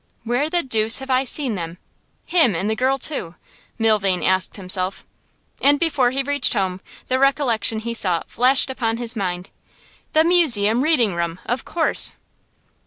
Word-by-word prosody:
'Where 245 +6 -1
the 345 +1 0
deuce 225 -3 +3
have 265 0 -5
I 260 +1 +1
seen 265 -1 -1
them 170 -3 -6 0.5
him 315 - +2
and 190 +5 -2
the 220 - -1
girl 260 +4 0
too?' 235 - -3 0.4
Milvain 205 -5 +1
asked 185 0 0
himself. 185 -1 -1 0.6
And 285 +1 +4
before 295 -7 +2
he 270 +2 -2
reached 285 +1 +1
home 190 -3 -2 0.3
the 260 0 0
recollection 265 -5 +1
he 230 +2 -5
sought 180 -7 -1
flashed 260 +3 +1
upon 230 -3 -2
his 240 0 -3
mind. 180 -3 -4 0.6
'The 315 - +4
Museum 250 - +3
Reading 250 - +2
room, 170 0 -4
of 245 +2 -3
course! 325 -1 +2
235 Hz, 160 wpm, -20 LUFS, 195-270 Hz, 0.6 s, And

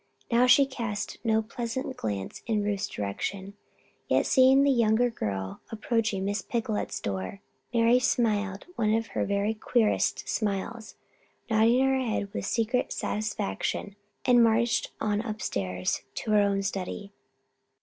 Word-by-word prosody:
Now 240 +2 +5
she 275 +3 +7
cast 230 -6 -4
no 220 -1 +2
pleasant 240 +3 -4
glance 100 -3 -4
in 215 -3 +1
Ruth's 205 -1 -1
direction. 190 - -4 0.5
Yet, - - +2
seeing 265 +1 +5
the 280 - +4
younger 235 0 +3
girl 95 - -4
approaching 225 -3 -1
Miss 205 +1 -1
Picolet's 225 -2 -2
door, 95 - -4 0.3
Mary 235 +1 +4
smiled 210 -6 0
one 215 -1 +2
of 225 0 -2
her - - -1
very 200 +2 0
queerest 220 0 +1
smiles, 215 +2 -3 0.6
nodded 225 +3 +4
her 265 0 +3
head 215 -5 -2
with 195 - -3
secret 235 +2 0
satisfaction, 205 - -3 0.3
and 245 -1 +6
marched 230 0 +2
on 210 -1 0
upstairs 95 - -2
to 220 - -3
her 210 -1 +5
own 200 -1 +1
study. 195 +1 -4
215 Hz, 135 wpm, -28 LUFS, 200-235 Hz, 0.6 s, she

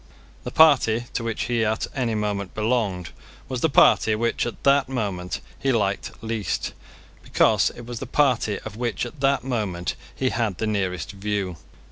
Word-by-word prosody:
The - - -4
party 130 -7 +5
to 115 - -2
which 115 -1 -2
he 120 -1 0
at 110 0 0
any 120 -4 0
moment 105 -2 -2
belonged 105 -6 0 0.4
was 125 -2 -4
the 160 - +3
party 110 -5 +5
which, 115 +2 0
at 115 - -7
that 140 -1 +4
moment, 100 -8 -3 0.2
he 135 - +1
liked 100 -3 -1
least, 110 -5 -2 0.5
because - - +3
it 120 - -9
was 120 -1 -6
the 135 - -6
party 125 -7 +2
of 110 -1 -7
which 120 -1 -1
at 120 +4 -10
that 135 -1 +2
moment 105 -9 -2 0.2
he 130 - 0
had 110 -8 -1
the - - -1
nearest 95 -5 -1
view. 100 -3 -3
110 Hz, 170 wpm, -24 LUFS, 100-125 Hz, 0.5 s, party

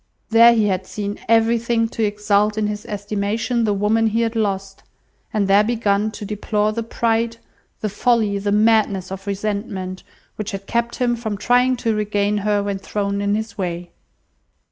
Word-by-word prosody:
There 230 +1 +7
he 220 -2 +3
had 190 -2 -1
seen 205 -1 -5
everything 230 0 +3
to 225 - -2
exalt 210 0 +1
in 215 - +1
his 210 0 -4
estimation 210 +3 -1
the 210 - +1
woman 220 +3 +2
he 225 +2 0
had 230 0 -1
lost; 195 -3 -2 0.5
and 210 -2 0
there 200 +2 +5
begun 215 -2 +1
to 210 - -7
deplore 210 +1 -1
the 230 +2 -3
pride, 230 0 0 0.4
the 215 - 0
folly, 220 -2 +1
the 205 +1 -1
madness 210 -3 +2
of 195 +1 -7
resentment, 200 -2 -3 0.4
which 210 -1 -4
had 195 0 -6
kept 235 +2 -1
him 240 -1 +1
from 220 -3 -4
trying 250 +4 +3
to 230 -2 -1
regain 210 -1 0
her 205 0 +1
when 200 -1 -3
thrown 200 0 -2
in 205 0 +1
his 220 0 -5
way. 175 -1 -4
210 Hz, 170 wpm, -20 LUFS, 200-225 Hz, 0.5 s, There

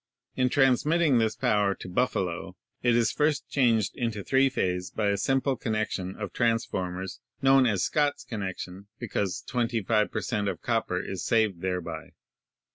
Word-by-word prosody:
In 125 0 +2
transmitting 145 +2 +3
this 110 -1 +1
power 105 -2 +2
to - - -9
Buffalo, 90 -4 -1 0.3
it 120 -1 +3
is 115 -2 +3
first 150 -1 0
changed 115 -7 +2
to 115 -5 -3
three 135 +4 +3
phase 90 -6 -1
by 105 0 -1
a 100 - +2
simple 135 +6 +1
con 110 -2 -3
nection 100 -3 -2
of 100 -2 -5
transformers 95 -6 -1
— - - -45
known 135 -1 +6
as 100 -6 +1
Scott's 145 -2 +1
connection 95 -2 -6
— - - -50
because 100 -5 -2
25 115 -3 0
per - - -2
cent, 105 -4 -1
of - - -2
copper 115 -6 0
is 95 0 -5
saved 110 -6 +1
thereby. 85 -4 -4
110 Hz, 165 wpm, -27 LUFS, 95-125 Hz, 0.3 s, known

